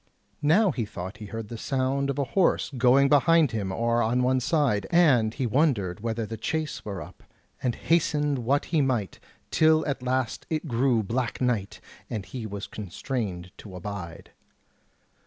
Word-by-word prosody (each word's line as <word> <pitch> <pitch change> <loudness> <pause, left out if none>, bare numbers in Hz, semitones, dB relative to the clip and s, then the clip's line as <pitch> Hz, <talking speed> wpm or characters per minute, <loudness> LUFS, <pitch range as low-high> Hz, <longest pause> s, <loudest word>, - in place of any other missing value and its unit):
Now 180 +7 +4
he 125 -5 -2
thought 95 -2 -7
he 105 - -8
heard 110 0 -6
the 115 - -7
sound 135 +2 0
of 140 - -2
a 140 - +1
horse 190 -5 +2
going 130 +3 +5
behind 150 0 +4
him 100 -4 -2
or 115 +4 +1
on 120 +3 +1
one 130 +1 +2
side, 125 - +1
and 135 -11 +4
he 130 +3 -3
wondered 115 - +1
whether 115 +1 -2
the 115 +1 -6
chace 155 +7 -3
were 100 -3 -5
up, - - -15 0.4
and 125 -3 0
hastened 150 -4 +1
what 135 +5 +1
he 155 - +4
might, 125 -8 -1 0.3
till 155 0 +4
at 140 -2 -2
last 130 -1 -2
it 155 0 -2
grew 120 -2 +2
black 120 +4 -2
night, 120 -6 -1 0.3
and 105 -4 -4
he 120 -4 -6
was 100 -1 -6
constrained 95 -3 -5
to 95 -4 -10
abide. 90 -2 -7
125 Hz, 170 wpm, -26 LUFS, 105-140 Hz, 0.4 s, going